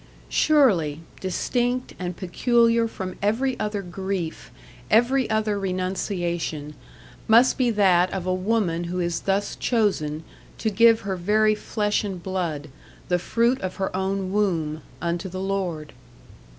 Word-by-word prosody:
Surely, 190 Hz, -, +3 dB, 0.2 s
distinct 245 Hz, +7 st, -1 dB
and 180 Hz, -1 st, -4 dB
peculiar 230 Hz, +4 st, +2 dB
from 190 Hz, -4 st, -6 dB
every 240 Hz, +6 st, +1 dB
other 210 Hz, -1 st, -2 dB
grief, 185 Hz, -2 st, -4 dB, 0.4 s
every 245 Hz, +3 st, +3 dB
other 215 Hz, -2 st, 0 dB
renunciation, 180 Hz, -5 st, -2 dB, 0.5 s
must 235 Hz, +3 st, +6 dB
be 255 Hz, -2 st, +2 dB
that 185 Hz, -5 st, +3 dB
of 190 Hz, -2 st, -3 dB
a 185 Hz, -, +1 dB
woman 185 Hz, -3 st, 0 dB
who 180 Hz, +1 st, -3 dB
is 170 Hz, -1 st, -1 dB
thus 195 Hz, +1 st, -1 dB
chosen 165 Hz, -10 st, 0 dB, 0.3 s
to 220 Hz, -, -1 dB
give 230 Hz, +2 st, +5 dB
her 195 Hz, -1 st, -3 dB
very 215 Hz, +4 st, +3 dB
flesh 210 Hz, 0 st, -1 dB
and 190 Hz, -4 st, -5 dB
blood, 170 Hz, -6 st, -3 dB, 0.4 s
the 180 Hz, 0 st, +2 dB
fruit 235 Hz, +7 st, +1 dB
of 185 Hz, -1 st, -4 dB
her 190 Hz, -2 st, -3 dB
own 190 Hz, 0 st, -1 dB
womb, 165 Hz, -7 st, 0 dB, 0.2 s
unto 170 Hz, +2 st, -2 dB
the 185 Hz, -, -7 dB
Lord! 185 Hz, -6 st, -3 dB
195 Hz, 135 wpm, -24 LUFS, 175-220 Hz, 0.5 s, must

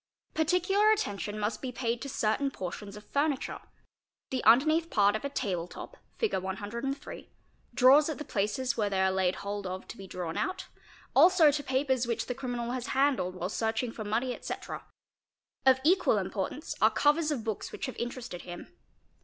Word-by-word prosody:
Particular 360 Hz, +6 st, +3 dB
attention 210 Hz, -, 0 dB
must 210 Hz, +1 st, -2 dB
be 260 Hz, -, -3 dB
paid 235 Hz, -1 st, -2 dB
to 275 Hz, -, -5 dB
certain 245 Hz, +3 st, 0 dB
portions 200 Hz, -2 st, -6 dB
of 210 Hz, -, -12 dB
furniture. 285 Hz, -1 st, -1 dB, 0.7 s
The 260 Hz, -1 st, -1 dB
underneath 310 Hz, +8 st, +5 dB
part 205 Hz, -4 st, +3 dB
of 215 Hz, -, -3 dB
a 280 Hz, -, -2 dB
table 185 Hz, -11 st, -2 dB
top -, -, -9 dB, 0.2 s
(Fig. 445 Hz, -, 0 dB
103), 205 Hz, +8 st, -5 dB, 0.5 s
drawers 275 Hz, +5 st, +6 dB
at 310 Hz, -, -3 dB
the 300 Hz, -, -6 dB
places 235 Hz, +6 st, -1 dB
where 210 Hz, -3 st, 0 dB
they 195 Hz, -1 st, 0 dB
are 190 Hz, 0 st, +3 dB
laid 190 Hz, -1 st, +1 dB
hold 200 Hz, 0 st, -4 dB
of 185 Hz, +1 st, -6 dB
to -, -, -8 dB
be 195 Hz, -, -9 dB
drawn 175 Hz, -3 st, -4 dB
out, 375 Hz, -, -2 dB, 0.5 s
also 345 Hz, -4 st, +7 dB
to 290 Hz, +1 st, -1 dB
papers 260 Hz, -2 st, +1 dB
which 235 Hz, -1 st, -1 dB
the 250 Hz, -, -3 dB
criminal 245 Hz, -2 st, -3 dB
has 255 Hz, 0 st, -3 dB
handled 260 Hz, -10 st, +2 dB
while 180 Hz, 0 st, -3 dB
searching 225 Hz, +3 st, -1 dB
for 225 Hz, -, -6 dB
money, 230 Hz, +5 st, -1 dB
etc.; -, -, -6 dB, 0.8 s
of 260 Hz, 0 st, +7 dB
equal 365 Hz, +5 st, +4 dB
import -, -, -2 dB
_ -, -, -7 dB
ance -, -, -6 dB
are -, -, +7 dB
covers 300 Hz, +2 st, +2 dB
of 275 Hz, -7 st, -2 dB
books 220 Hz, -2 st, -4 dB
which -, -, -4 dB
have 260 Hz, -, -6 dB
interested 240 Hz, -6 st, -5 dB
him. 175 Hz, -, -9 dB
240 Hz, 185 wpm, -30 LUFS, 205-280 Hz, 0.8 s, also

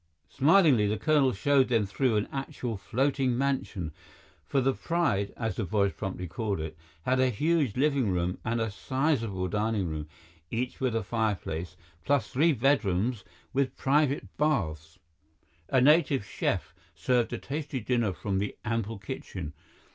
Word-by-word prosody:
Smilingly, 145 Hz, -, +5 dB
the 105 Hz, +1 st, 0 dB
colonel 145 Hz, +2 st, +3 dB
showed 135 Hz, +5 st, +3 dB
them 115 Hz, -4 st, +2 dB
through 115 Hz, +4 st, +1 dB
an 105 Hz, -, 0 dB
actual 130 Hz, -4 st, -4 dB
floating 130 Hz, +5 st, 0 dB
mansion, 130 Hz, -, -1 dB, 0.6 s
for 140 Hz, -, +1 dB
the 135 Hz, +1 st, +2 dB
Pride, 130 Hz, -, 0 dB
as 110 Hz, -5 st, -2 dB
the 115 Hz, -, 0 dB
boys 100 Hz, +1 st, +1 dB
promptly 95 Hz, -3 st, -4 dB
called 100 Hz, +1 st, -2 dB
it, 80 Hz, 0 st, -5 dB, 0.3 s
had 130 Hz, +5 st, +1 dB
a 130 Hz, 0 st, +4 dB
huge 145 Hz, -1 st, +1 dB
living 140 Hz, -5 st, +2 dB
room 90 Hz, 0 st, -1 dB
and 115 Hz, +1 st, -1 dB
a 110 Hz, -2 st, -1 dB
sizable 115 Hz, -5 st, -1 dB
dining 105 Hz, 0 st, 0 dB
room, 80 Hz, -1 st, -4 dB, 0.4 s
each 125 Hz, +2 st, -3 dB
with 130 Hz, -4 st, 0 dB
a 115 Hz, -, 0 dB
fireplace, 95 Hz, -6 st, -2 dB, 0.3 s
plus 135 Hz, +1 st, +1 dB
three 160 Hz, +6 st, +3 dB
bedrooms 115 Hz, -, +1 dB, 0.3 s
with 135 Hz, -1 st, 0 dB
private 145 Hz, 0 st, +2 dB
baths. 80 Hz, -, -1 dB, 0.7 s
A 130 Hz, -, +4 dB
native 140 Hz, -4 st, +4 dB
chef 85 Hz, -5 st, -2 dB, 0.2 s
served 120 Hz, +7 st, +1 dB
a -, -, -2 dB
tasty 145 Hz, -1 st, -4 dB
dinner 120 Hz, -2 st, +1 dB
from 95 Hz, +1 st, -2 dB
the 100 Hz, +1 st, -3 dB
ample 115 Hz, -1 st, -2 dB
kitchen. 90 Hz, -4 st, -6 dB
115 Hz, 150 wpm, -28 LUFS, 100-135 Hz, 0.7 s, Smilingly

